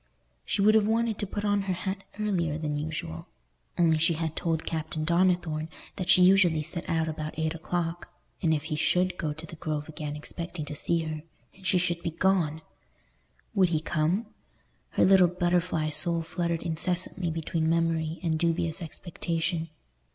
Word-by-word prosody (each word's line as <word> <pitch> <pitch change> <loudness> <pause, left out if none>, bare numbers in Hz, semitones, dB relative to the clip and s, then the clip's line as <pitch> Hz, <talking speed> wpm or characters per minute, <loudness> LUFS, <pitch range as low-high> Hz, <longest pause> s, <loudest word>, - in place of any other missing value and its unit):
She 200 - +1
would 215 +1 +6
have 215 -1 +4
wanted 225 -1 +1
to 205 - -2
put 205 +2 -3
on 205 -1 +2
her - - +2
hat 190 +2 -4 0.2
earlier 175 -8 0
than 150 -2 -2
usual; 150 - -4 0.5
only 160 -2 +4
she 165 +2 +3
had 160 0 -2
told 165 -2 -1
Captain 160 -1 -3
Donnithorne 170 -2 +2 0.3
that 185 - -4
she 185 - +7
usually 180 -4 +5
set 170 +3 -4
out 160 -1 +1
about 155 -1 -4
eight 160 0 0
o'clock, 170 0 -3 0.3
and 165 - +2
if 150 -2 +1
he 155 -1 -3
should 180 +4 +2
go 155 -4 -2
to 160 +2 -7
the 165 0 -10
Grove 150 -1 -3
again 150 -1 -5
expecting 165 +1 -6
to 150 - -6
see 165 +3 0
her, 155 -1 -4 0.3
and 190 -1 -9
she 180 - +4
should 170 -1 0
be 170 - -1
gone! 165 -3 +1 0.9
Would 190 -4 +4
he 160 -2 +1
come? 165 +7 0 0.6
Her - - +3
little 190 -1 +7
butterfly 175 -3 0
soul 165 +2 +2
fluttered 170 0 -2
incessantly 175 +2 -1
between 160 0 -1
memory 165 -1 +1
and 160 -2 +1
dubious 170 +1 0
expectation. 165 0 -3
165 Hz, 175 wpm, -28 LUFS, 160-180 Hz, 0.9 s, she